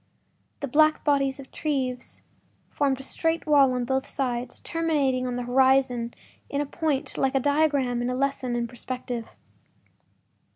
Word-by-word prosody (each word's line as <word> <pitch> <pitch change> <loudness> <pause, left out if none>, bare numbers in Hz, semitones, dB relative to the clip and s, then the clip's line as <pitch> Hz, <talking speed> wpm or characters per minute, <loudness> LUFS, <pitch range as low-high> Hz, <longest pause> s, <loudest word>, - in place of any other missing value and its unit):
The 280 - -2
black 310 +3 +3
bodies 275 -2 +2
of 275 - -8
the - - -31
trees 260 -5 -3 0.5
formed 270 -2 +1
a - - -8
straight 325 +4 -1
wall 285 -4 +5
on 250 -1 -1
both 265 +1 -1
sides, 245 -2 -3
terminating 285 -6 0
on 250 - -2
the 245 - -2
horizon 255 -1 +2 0.3
in 280 - -1
a 290 - 0
point, 295 -2 -2
like 270 0 +1
a - - +4
diagram 285 -3 +2
in 245 - -1
a 250 - -1
lesson 270 -2 -1
in 240 0 0
perspective. 245 -1 -6
265 Hz, 160 wpm, -26 LUFS, 250-285 Hz, 0.5 s, wall